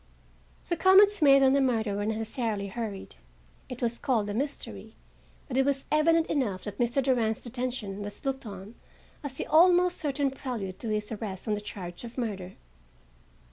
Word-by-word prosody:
The 345 - 0
comments 395 +3 +6
made 275 -2 +7
on 265 0 +5
the 280 - +3
murder 230 -5 +1
were 205 +1 -2
necessarily 220 -2 -2
hurried. 210 -2 -6 0.5
It 250 -1 -6
was 235 0 0
called 220 -6 0
a - - -3
mystery, 225 - -4 0.5
but 255 - -3
it 270 - +5
was 275 0 0
evident 325 +2 +4
enough 220 - -1
that 205 -1 -7
Mr. 240 +3 +1
Durand's 235 -5 +1
detention 240 -5 -4
was 205 +7 -7
looked 270 -3 -2
on 200 +1 -9 0.5
as 285 -3 -5
the - - -4
almost 355 +3 +5
certain 280 -2 0
prelude 230 -9 -5
to 230 - -4
his 210 0 -2
arrest 205 -3 -5
on 215 - +1
the 210 - -2
charge 180 -3 -8
of 235 +1 -9
murder. 195 -6 -4
240 Hz, 175 wpm, -28 LUFS, 205-275 Hz, 0.5 s, made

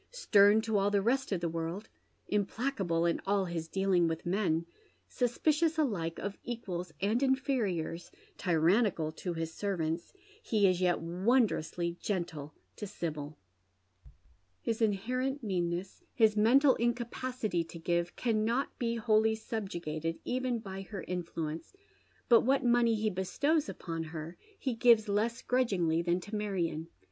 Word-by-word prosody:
Stem 215 - +4
CO 220 -2 0
all 200 0 +2
the 205 0 +2
rest 255 +6 0
of 185 -3 0
the 170 - 0
world, 165 +5 -4 0.4
implacable 200 -4 0
in 170 - +1
all 200 -1 +2
his 170 -2 -4
dealing 190 -1 +2
with 165 0 -3
men, 175 -3 +1 0.4
suspicious 305 +6 +1
alike 190 - 0
of 200 0 -5
equals 185 -8 -5
and 215 +5 +1
inferiors, 235 - 0 0.3
tyi 175 -3 0
annical 165 -2 +2
to 180 - -3
hia 165 0 -2
servants, 165 -1 -3 0.3
he 215 - +2
is 185 -1 +3
yet 180 -1 +2
wondrously 175 -2 0
gentle 165 -7 -3 0.3
to 210 - -5
Sibyl. 155 -6 -5 1.2
His 225 0 -2
inherent 255 +6 0
meanneffi, 180 -2 -2
his 220 -3 +4
mental 255 +6 +5
incapacity 240 -4 -1
to 170 - -10
give, 170 +1 -1
carmot 230 +3 0
be 235 -1 0
wholly 220 -1 +3
sub 220 -2 -4
jugated 165 -1 -3
even 255 -1 -1
by 195 -3 -7
her 195 0 -7
influence, 165 - -5 0.5
but 235 -2 +7
what 265 +1 +2
money 235 -1 +4
he 215 0 0
bestows 285 - 0
upon 165 -2 -5
ber 165 +1 -6 0.2
he 260 - -2
gives 230 -2 +5
less 225 +4 0
grudgingly 190 -10 +1
than 175 +1 +1
to 205 +4 -7
Marion. 180 -6 -2
200 Hz, 140 wpm, -31 LUFS, 170-235 Hz, 1.2 s, but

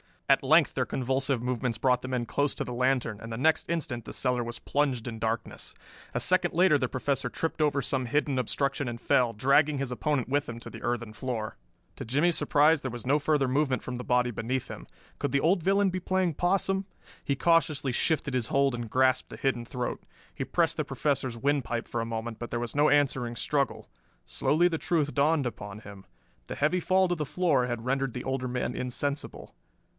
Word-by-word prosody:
At - - +5
length - - +4
their - - 0
convulsive 130 -1 -1
movements 125 -2 -1
brought 125 +1 +2
the - - -6
men 125 -2 -1
close 145 +4 0
to - - -2
the 125 - -6
lantern, 125 -4 0
and 115 - -8
the 115 - -4
next 160 +6 +2
instant 155 -8 -2
the - - -7
cellar 125 -2 +1
was 120 0 -5
plunged 135 -5 -1
in 115 -2 -5
darkness. 115 0 -4 0.4
A - - +2
second - - +2
later 175 -3 +5
the 130 - 0
Professor 135 +2 -1
tripped 165 -1 -3
over 145 -2 +2
some 130 0 -1
hidden 140 +1 0
obstruction 140 +3 -1
and 120 0 -4
fell, 125 -4 +2
dragging 140 +6 +3
his 135 -2 -3
opponent 130 0 -1
with 145 +1 +1
him 115 0 -6
to - - -8
the - - -9
earthen 120 -2 -2
floor. 110 -2 -4 0.4
To 135 - -6
Jimmie's 150 +8 +2
surprise 150 +2 +4
there 130 - -4
was 120 0 -7
no 140 +4 +3
further 145 -2 +1
movement 135 0 +1
from 125 -1 -5
the 125 - -6
body 125 0 +2
beneath 120 +4 -3
him. - - -9 0.3
Could 140 - -2
the 140 - +3
old 175 +3 +3
villain 195 +1 +3
be 185 0 -3
playing 185 -1 0
possum? 195 +3 +1 0.4
He 140 - 0
cautiously 155 -4 +2
shifted 140 +2 0
his 125 -3 0
hold 140 -1 +2
and 120 -2 -5
grasped 130 +1 +2
the - - -9
hidden 125 -3 -1
throat. 125 0 -4 0.3
He - - -4
pressed - - +1
the - - -1
Professor's 130 -5 -1
windpipe 130 -3 -1
for 120 - -2
a - - -2
moment, 115 0 -5
but 120 - -5
there 120 - -1
was 120 +2 -4
no 145 +1 +4
answering 130 -5 +1
struggle. 140 +4 -1 0.4
Slowly 175 +4 +2
the 160 -2 -2
truth 150 -4 0
dawned 145 0 +2
upon 105 -3 -6
him. 100 -2 -12 0.4
The - - -5
heavy 155 +5 +1
fall 185 +1 +2
to 175 - +1
the 155 -2 -3
floor 145 -6 +1
had 120 -1 -4
rendered 135 -1 0
the 125 - -5
older 130 -1 -2
man 125 0 -2
insensible. 130 +3 -3
130 Hz, 210 wpm, -28 LUFS, 120-150 Hz, 0.4 s, At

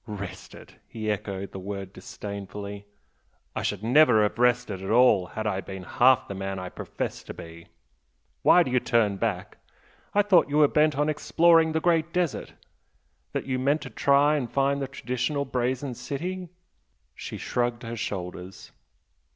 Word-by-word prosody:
"Rested!" 100 -3 -8
he 110 -1 -3
echoed 100 -2 -4
the 95 - -7
word 100 0 -6
disdainfully 100 0 -8 0.7
"I - - -2
should 105 0 -2
never 125 -2 +5
have 105 +2 -1
rested 125 -5 +1
at 95 - -5
all 110 -6 +5
had 110 +4 -5
I 100 -3 -1
been 95 -1 -8
half 125 +6 +3
the - - -5
man 95 0 -4
I 90 -1 -5
profess - - -5
to - - -9
be! 85 0 -11 0.7
Why 180 - +6
do 130 - -5
you 125 - +3
turn 110 -5 +1
back? 105 -2 -3 0.6
I 205 - +5
thought 185 -7 +4
you 145 - 0
were 150 -1 +6
bent 150 -1 +2
on 150 +1 +2
exploring 165 +2 +3
the 160 - +1
Great 165 -1 +1
Desert! 175 -5 -2 0.8
that - - -2
you 130 -1 -1
meant 140 +4 +1
to 130 - -8
try 140 +5 +3
and 125 -5 -4
find 140 +1 +1
the 135 - -2
traditional 130 +2 -2
Brazen 130 +1 -2
City?" 180 +8 -5 0.6
She - - -7
shrugged 120 0 -2
her 115 0 -5
shoulders. 90 -3 -6
120 Hz, 165 wpm, -26 LUFS, 100-145 Hz, 0.8 s, Why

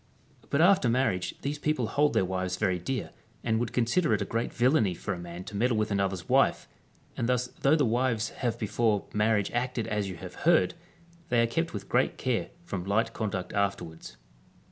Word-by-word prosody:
* - - -28
But 140 - +2
after 180 -8 +5
marriage 115 -7 0
these 145 +1 -2
people 150 -5 0
hold 145 +6 +2
their - - +3
wives 90 0 -2
very 95 -1 +1
dear, 130 +9 -3 0.3
and 110 -1 +1
would 120 -1 -2
consider 125 +2 +2
it 105 - -3
a - - -5
great 115 +4 -2
villainy 120 - +2
for 100 - -3
a 90 - -6
man 85 +1 -7
to 105 - -9
meddle 115 +2 +2
with 110 0 0
another's 95 -2 -1
wife; - - +3 0.5
and 120 - -1
thus 125 0 +1
though 140 +3 +5
the 150 -4 +3
wives 120 -1 +1
have 120 -2 -2
before 110 -1 0
marriage 105 -1 +2
acted 120 -1 -1
as 105 -3 -2
you 95 - -6
have 90 +1 -9
heard, 170 0 +4 0.6
they 120 - +3
are - - +4
kept 165 +8 -1
with - - -6
great - - +1
care - - -1
from 95 -3 -4
light 110 +4 0
conduct 100 -5 -3
afterwards. 100 -5 -3
115 Hz, 200 wpm, -28 LUFS, 100-125 Hz, 0.6 s, after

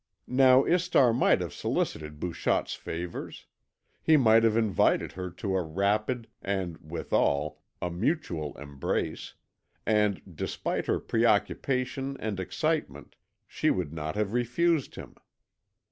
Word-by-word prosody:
Now 130 0 +5
Istar 170 -9 +3
might 120 - +3
have - - -4
solicited 75 -1 -2
Bouchotte's 85 0 -1
favours; 85 +1 -6 0.6
he 160 -1 +5
might 115 -4 +5
have 115 -1 +3
invited 110 -6 +2
her 90 0 -5
to 95 +2 -3
a 95 - +2
rapid, 105 +8 0
and, 95 -4 -3
withal, 75 -2 -1 0.2
a 90 - -1
mutual 85 - -2
embrace, 70 -1 -3 0.5
and, 105 -2 +2 0.2
despite - - -3
her - - +1
preoccupation 135 +1 0
and 105 -3 -3
excitement, 95 - -2 0.3
she - - 0
would 85 -5 -1
not 80 +1 -4
have 105 0 -1
refused 135 +6 +1
him. - - -10
105 Hz, 120 wpm, -28 LUFS, 85-125 Hz, 0.6 s, Now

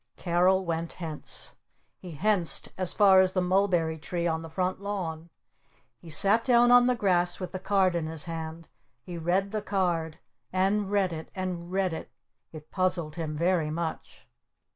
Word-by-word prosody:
Carol 185 +2 +2
went 165 0 -3
hence. 160 -4 -4 0.4
He 180 -3 -9
henced 180 -3 0
as 185 -2 0
far 195 -2 +6
as 185 0 +2
the 185 - +1
Mulberry 180 -3 +1
Tree 170 +2 -3
on 160 -1 0
the 165 - -8
front 185 +3 -2
lawn. 170 -5 -4 0.7
He 170 - -13
sat 200 +8 +3
down 240 -1 +5
on 245 0 +7
the 250 - +2
grass 180 -5 +1
with 185 - -5
the 185 - -5
card 190 -2 +2
in 165 -2 -1
his 160 -2 -3
hand. 165 -1 -6 0.4
He 175 -2 -7
read 185 +4 0
the 215 -1 -2
card. 175 -6 -1 0.3
And 195 +2 +1
read 195 -3 +1
it. 160 0 -7
And 180 -2 -4
read 190 -2 0
it. 160 - -7 0.4
It 155 -1 -12
puzzled 180 -5 -1
him 155 -3 -4
very 170 -1 +1
much. 165 +1 -5
180 Hz, 170 wpm, -28 LUFS, 165-190 Hz, 0.7 s, on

